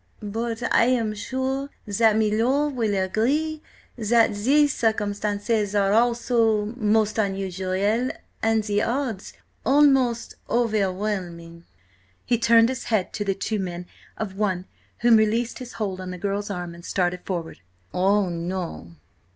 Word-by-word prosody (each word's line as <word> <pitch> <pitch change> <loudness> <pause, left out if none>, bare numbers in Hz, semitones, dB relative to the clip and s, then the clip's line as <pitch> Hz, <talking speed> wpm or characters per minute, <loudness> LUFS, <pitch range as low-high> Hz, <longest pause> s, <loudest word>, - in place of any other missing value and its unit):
But 225 +3 -3
I 230 - +5
am 235 -4 +1
sure 260 +5 -3 0.2
that 215 +1 +3
milor' 230 +7 +2
will 230 -7 -1
agree 270 +12 0 0.3
that 230 -1 +3
the 270 +9 +3
circumstances 210 -3 -1
are 200 -1 +3
also–most 225 -2 +2
unusual–and 200 +3 -1
the 205 -1 0
odds–almost 260 +1 0
overwhelming!" 190 -6 -2 0.6
He 240 - +1
turned 230 0 +5
his 260 0 -4
head 215 -5 0
to 210 - -2
the 195 -1 -1
two 215 +2 -2
men, 180 -2 -4 0.3
one 200 -2 -1
of - - -17 0.4
whom 235 -1 +6
released 225 +3 +1
his 250 -1 -8
hold 195 -4 -3
on 185 - -6
the 180 - -6
girl's 200 +2 -2
arm 175 -3 -5
and 170 0 -13
started 180 -1 -1
forward. 170 -4 -5 0.3
"Oh, 195 +2 +2
no!" 170 - -5
215 Hz, 125 wpm, -24 LUFS, 195-235 Hz, 0.6 s, whom